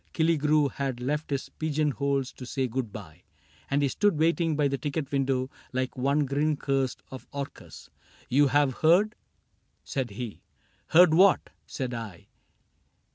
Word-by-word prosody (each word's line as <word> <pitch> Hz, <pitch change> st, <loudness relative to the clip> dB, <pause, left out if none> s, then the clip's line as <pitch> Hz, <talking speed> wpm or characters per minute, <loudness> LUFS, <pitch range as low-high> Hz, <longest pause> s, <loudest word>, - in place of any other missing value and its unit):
Killigrew 155 Hz, -3 st, +3 dB
Had 135 Hz, -3 st, -3 dB
left 150 Hz, +5 st, -2 dB
his 140 Hz, -2 st, -3 dB
pigeonholes 140 Hz, -3 st, 0 dB
to -, -, -10 dB
say 130 Hz, -1 st, -1 dB
good 120 Hz, -2 st, -3 dB
by. 90 Hz, -6 st, -10 dB, 0.5 s
And 140 Hz, +1 st, +1 dB
he -, -, +3 dB
stood 200 Hz, +5 st, +1 dB
waiting 165 Hz, 0 st, +2 dB
by 145 Hz, -1 st, +2 dB
the 140 Hz, -1 st, -2 dB
ticket 145 Hz, +2 st, -3 dB
window 135 Hz, -2 st, 0 dB, 0.2 s
Like 130 Hz, 0 st, -2 dB
one 140 Hz, +3 st, +1 dB
grin 145 Hz, +2 st, 0 dB
cursed 135 Hz, -2 st, -1 dB
of 130 Hz, -, -9 dB
Orcus. 140 Hz, 0 st, -8 dB, 0.2 s
— -, -, -27 dB
"You 145 Hz, +3 st, +4 dB
have 140 Hz, -1 st, +2 dB
heard? 185 Hz, +7 st, +4 dB, 0.4 s
" -, -, -41 dB, 0.3 s
Said 130 Hz, -3 st, -3 dB
he. 105 Hz, -4 st, -7 dB
— -, -, -39 dB
" -, -, -40 dB
Heard 175 Hz, -1 st, +8 dB
what? 190 Hz, +3 st, +4 dB
" -, -, -43 dB
said 130 Hz, -3 st, -4 dB
I. 110 Hz, -7 st, -8 dB
140 Hz, 170 wpm, -27 LUFS, 130-150 Hz, 0.5 s, Heard